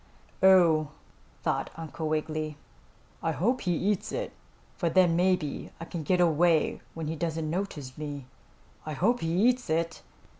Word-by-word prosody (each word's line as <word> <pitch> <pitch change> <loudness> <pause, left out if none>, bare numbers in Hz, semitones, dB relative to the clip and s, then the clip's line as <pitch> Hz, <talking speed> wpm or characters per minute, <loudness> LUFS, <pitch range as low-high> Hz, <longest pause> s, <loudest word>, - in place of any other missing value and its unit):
"Oh," 170 -5 +6 0.6
thought - - 0
Uncle 160 -1 -5
Wiggily. 155 -1 -2 0.6
"I 165 - 0
hope 240 - +1
he 180 - 0
eats 195 +3 0
it, - - -3 0.4
for 170 -5 0
then 175 -1 +4
maybe 180 -4 +1
I 165 - -6
can 170 -1 -5
get 180 +4 +1
away 165 -1 +3
when 165 -1 -4
he 160 +2 -2
doesn't 160 0 -2
notice 160 -8 -4
me. 145 -3 -5 0.6
I 155 - -5
hope 225 - +2
he 165 - -2 0.2
eats 250 0 +1
it!" 165 +1 -1
165 Hz, 150 wpm, -28 LUFS, 155-185 Hz, 0.6 s, Oh